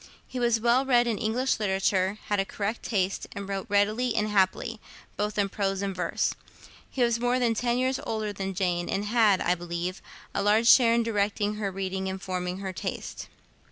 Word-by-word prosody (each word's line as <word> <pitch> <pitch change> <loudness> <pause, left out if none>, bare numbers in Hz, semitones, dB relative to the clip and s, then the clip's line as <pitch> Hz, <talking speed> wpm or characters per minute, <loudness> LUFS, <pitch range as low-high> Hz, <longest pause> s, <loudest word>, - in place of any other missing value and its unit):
He 255 - -5
was 235 -2 +2
well 240 +3 +3
read 245 -3 +4
in 230 -3 -1
English 245 +3 0
literature, 190 -1 +1
had 205 -1 0
a - - +3
correct 205 +3 -3
taste, 195 -3 -1
and 200 -1 -6
wrote 195 -1 -4
readily 215 +4 +2
and 215 -1 +1
happily, 210 +3 +1 0.4
both 210 +1 -2
in 200 -1 +2
prose 195 0 -2
and 195 -1 -2
verse. 180 - 0 0.6
He 255 - 0
was 235 -1 +2
more 245 +1 +1
than 240 -2 +2
ten 240 +2 0
years 260 +1 0
older 215 -2 -2
than 195 -1 -4
Jane, 175 -2 -1
and 200 +2 -1
had, 210 -3 +3
I 175 - +2
believe, 175 +1 -4 0.3
a - - 0
large 215 +3 +3
share 235 -2 +7
in 235 - +2
directing 210 -1 0
her 205 -2 -1
reading 190 0 -3
and 190 0 -4
forming 180 -1 -3
her 190 -1 -4
taste. - - -5
205 Hz, 195 wpm, -27 LUFS, 190-230 Hz, 0.6 s, share